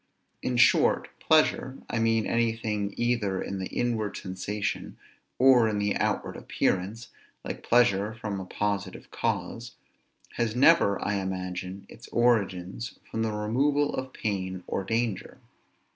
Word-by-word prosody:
In 125 - -1
short, 125 - +4
pleasure 150 -4 +2
(I 115 - -2
mean 115 -1 +2
anything 110 -3 -1
either 115 -6 0
in 100 - -4
the 95 - -3
inward 115 -4 -1
sensation, 100 +2 -4 0.4
or 125 -3 +6
in 105 - -1
the 105 0 0
outward - - -1
appearance, 100 +5 -1 0.4
like - - -5
pleasure 110 -4 +3
from 105 -3 -4
a 95 - -6
positive 100 -1 -3
cause) 120 +1 -3 0.6
has 115 -1 0
never, 130 -6 +5
I 105 -1 0
imagine, 95 0 -4
its 115 - -13
origin 100 -6 +1 0.3
from 115 - -2
the 110 -1 0
removal 140 +8 +1
of 130 0 -4
pain 95 -5 -3
or 95 - -2
danger. 115 -1 -2
110 Hz, 130 wpm, -27 LUFS, 100-120 Hz, 0.6 s, or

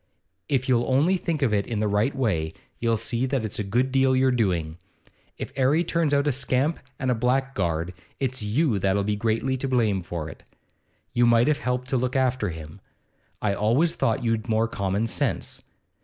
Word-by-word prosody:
If 130 -3 +1
you'll 120 -1 +2
only 145 +9 +3
think 160 -4 -2
of 115 -5 +2
it 100 -1 +1
in 115 -3 -2
the 105 - +1
right 105 +7 +1
way, 85 - 0 0.3
you'll 115 -1 +1
see 115 +3 -1
that's 120 -7 -2
a - - 0
good 120 +7 0
deal 135 0 +3
your 130 0 +3
doing. 90 -9 0 0.6
If - - -6
'Arry 140 +5 +3
turns 165 -3 0
out 140 0 +2
a 145 - +3
scamp 130 +4 0 0.2
and 130 -1 0
a - - +4
blackguard, 110 -9 0 0.3
it's 130 -2 -2
you 110 +2 +1
that 95 +1 +1
'll 100 - +1
be 105 +1 0
greatly 115 +5 0
to 135 - -3
blame 110 -7 +1
for 85 -3 -5
it. - - -10 0.7
You 120 -1 +4
might 120 0 +4
have 150 -1 +2
helped 125 0 -2
to 135 - +1
look 125 +1 -1
after 130 -5 +1
him. 80 +3 -9 0.6
I 105 -2 +2
always 120 +12 +2
thought 115 -8 0
you'd 115 -1 -1
more 110 +1 +2
common 100 0 -1
sense. 115 - -2
120 Hz, 195 wpm, -25 LUFS, 105-130 Hz, 0.7 s, a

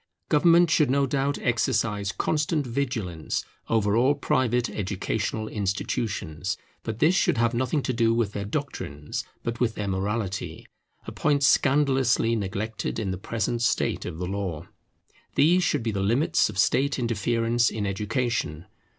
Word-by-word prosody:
Government 170 +2 +5
should 150 -6 +4
no 140 +1 +3
doubt 140 +1 0
exercise 110 -4 0
constant 150 +1 0
vigilance 115 - -2 0.2
over 105 -2 +2
all 130 +5 +4
private 125 -3 +1
educational 105 +2 -2
institutions; 95 -2 -2 0.2
but 110 -2 -4
this 155 +8 +4
should 190 - +2
have 115 +1 +2
nothing 130 +4 0
to 130 - -1
do 115 -1 +2
with 115 -3 +1
their 100 - -4
doctrines, 100 - -4 0.2
but 115 0 -3
with 115 -3 +1
their 105 - -3
morality, 95 +1 -3 0.4
a - - -6
point 145 -2 +1
scandalously 135 -5 +3
neglected 105 +1 -3
in 105 -4 -2
the 95 - -3
present 115 +3 -2
state 115 - +1
of 80 - -5
the 90 - -3
law. 95 -4 -4 0.7
These 175 +5 +4
should 145 -8 +1
be 110 - 0
the 100 -2 -2
limits 115 +9 +2
of 105 - -8
state 140 +8 +2
interference 115 0 +1
in 105 -2 -3
education. 100 - -2
115 Hz, 150 wpm, -26 LUFS, 100-135 Hz, 0.7 s, Government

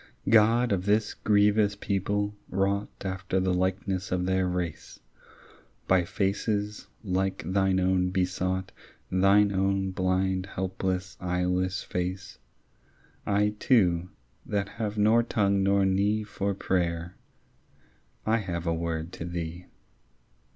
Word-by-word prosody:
God 115 +2 +5
of 95 -2 0
this 105 +1 +2
grievous 105 0 +3
people, 100 +1 -1 0.2
wrought 100 +2 0 0.2
After 95 0 -1
the 95 0 +1
likeness 95 +1 -1
of 90 -1 0
their 95 0 +1
race, 90 -3 -4 0.9
By 90 -2 +3
faces 105 +2 -2 0.2
like 95 -2 -1
thine 95 +1 +2
own 90 0 +2
besought, 95 0 -1 0.4
Thine 100 +2 +4
own 95 0 0
blind 95 0 0
helpless 95 0 -3
eyeless 90 +1 -1
face, 90 0 -4 0.9
I 105 +1 +3
too, 90 -8 +3 0.3
that 100 -1 -2
have 105 -1 -4
nor 110 +3 +5
tongue 100 -4 +1
nor 100 0 +3
knee 100 +3 +1
For 100 -2 -3
prayer, 85 -2 -1 1.1
I 110 +1 +3
have 90 -6 -4
a 85 - +1
word 80 0 -3
to 85 - -6
thee. 85 0 -5
95 Hz, 115 wpm, -27 LUFS, 90-100 Hz, 1.1 s, God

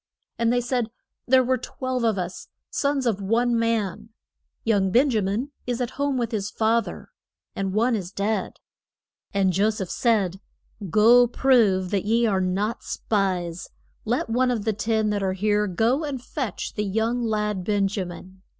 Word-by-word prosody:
And 230 0 +2
they 245 0 +2
said, 245 -2 -1 0.4
There 260 +1 +5
were 255 0 +1
twelve 255 0 -3
of 220 -3 +2
us, 180 0 -5 0.2
sons 280 -2 0
of 210 -4 0
one 235 +4 +1
man. 225 -2 -1 0.5
Young 200 -4 +2
Ben 260 +8 +4
ja 220 -3 +1
min 210 +9 -2 0.2
is 245 -1 -1
at 245 -1 -2
home 280 -1 -1
with 235 -2 -1
his 210 -2 -2
fa 225 +2 +2
ther, - - -9 0.4
and 195 -1 -2
one 230 +4 +2
is 185 -4 -4
dead. 205 0 -1 0.8
And 195 -2 +2
Jo 200 +4 +3
seph 200 -4 -4
said, 200 -6 +1 0.5
Go 235 +6 +6
prove 220 -8 +3
that 200 -2 0
ye 230 +2 +2
are 195 -4 +1
not 195 +5 -1
spies; 185 -4 -2 0.3
let 240 +3 -1
one 250 +3 +2
of 225 -4 -1
the 220 - +1
ten 215 +1 0
that 205 -1 -1
are 190 -1 0
here 210 +2 +1
go 225 - +1
and 285 -3 -3
fetch 250 -2 -4
the 210 - -2
young 225 +4 0
lad, 210 -4 -1
Ben 200 0 +1
ja 195 0 -2
min. 185 +2 -11
220 Hz, 175 wpm, -24 LUFS, 195-240 Hz, 0.8 s, Go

